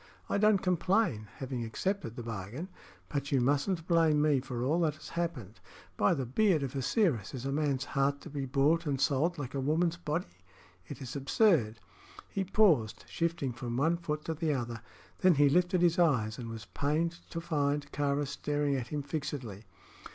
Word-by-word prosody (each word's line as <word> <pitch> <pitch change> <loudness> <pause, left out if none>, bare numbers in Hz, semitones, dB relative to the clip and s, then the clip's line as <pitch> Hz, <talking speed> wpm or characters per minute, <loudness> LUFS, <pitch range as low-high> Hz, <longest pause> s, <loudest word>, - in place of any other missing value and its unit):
I - - +1
don't 210 -2 +4
complain, 180 - +1
having 130 -2 -4
accepted 115 - -2
the 120 - -6
bargain; 115 - -6 0.4
but 140 -1 -3
you 135 - +3
mustn't 145 +7 +1
blame 165 -3 +4
me 150 -2 +3
for 125 -2 -4
all 155 +6 +2
that 155 -3 +1
has - - -11
happened. 130 - -4 0.4
By 175 - +3
the 135 -4 -2
beard 160 - +2
of 135 0 -4
Osiris! 135 - +1
is 130 0 -6
a 135 - -1
man's 140 -3 0
heart 140 0 0
to - - -9
be 140 -2 -3
bought 150 +5 +2
and 140 -2 0
sold 145 +6 +1
like 135 -3 -5
a 140 - -2
woman's 165 +5 +1
body? 150 - -4 0.5
It 140 -2 -7
is 125 +1 -7
absurd." 140 - +2 0.5
He 195 - -1
paused, 175 - +3
shifting 165 -6 -1
from 120 0 -4
one 160 +5 +3
foot 155 -3 -4
to 165 - -1
the 155 -1 0
other. 120 -3 -4 0.4
Then 185 -3 +5
he 145 0 +5
lifted 180 +3 +2
his 175 +1 +3
eyes, 120 -10 +2
and 115 -2 -6
was 115 -1 -7
pained 155 +6 -1
to 165 - -4
find 145 -3 -1
Kāra 145 0 0
staring 145 0 -1
at 125 -3 -3
him 145 +2 -3
fixedly. 135 - -5
145 Hz, 185 wpm, -31 LUFS, 130-170 Hz, 0.5 s, Then